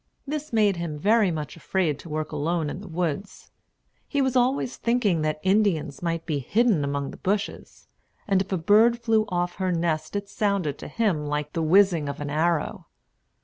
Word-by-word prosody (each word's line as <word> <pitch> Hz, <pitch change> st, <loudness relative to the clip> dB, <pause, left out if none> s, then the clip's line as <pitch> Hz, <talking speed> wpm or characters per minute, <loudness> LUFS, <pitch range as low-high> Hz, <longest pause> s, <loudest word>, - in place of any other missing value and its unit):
This 300 Hz, +1 st, -4 dB
made 210 Hz, -5 st, +3 dB
him 165 Hz, -3 st, -4 dB
very 210 Hz, +5 st, +3 dB
much 155 Hz, -3 st, -4 dB
afraid 165 Hz, -2 st, -1 dB
to 170 Hz, -, -11 dB
work 155 Hz, 0 st, -3 dB
alone 155 Hz, +1 st, -1 dB
in 180 Hz, -, -7 dB
the 205 Hz, -, -10 dB
woods. 175 Hz, +3 st, -4 dB, 0.6 s
He 285 Hz, -, -1 dB
was 265 Hz, -2 st, +1 dB
always 250 Hz, 0 st, +1 dB
thinking 230 Hz, -8 st, +1 dB
that 155 Hz, 0 st, -1 dB
Indians 185 Hz, -8 st, +1 dB
might 165 Hz, -1 st, -2 dB
be 150 Hz, -4 st, -1 dB
hidden 210 Hz, -, +2 dB
among 140 Hz, 0 st, -2 dB
the -, -, -11 dB
bushes; 200 Hz, +1 st, -3 dB, 0.4 s
and 195 Hz, -2 st, +3 dB
if 195 Hz, -, -6 dB
a 190 Hz, -, +1 dB
bird 215 Hz, +8 st, +4 dB
flew 225 Hz, -2 st, +2 dB
off 175 Hz, -1 st, -2 dB
her 185 Hz, -1 st, 0 dB
nest 165 Hz, 0 st, -1 dB
it 200 Hz, 0 st, -2 dB
sounded 200 Hz, -8 st, -1 dB
to -, -, -7 dB
him 185 Hz, -10 st, 0 dB
like 150 Hz, 0 st, -3 dB
the 165 Hz, -, -1 dB
whizzing 170 Hz, -2 st, +4 dB
of 140 Hz, -, -5 dB
an 145 Hz, -1 st, -4 dB
arrow. 160 Hz, +1 st, 0 dB
175 Hz, 190 wpm, -25 LUFS, 155-210 Hz, 0.6 s, bird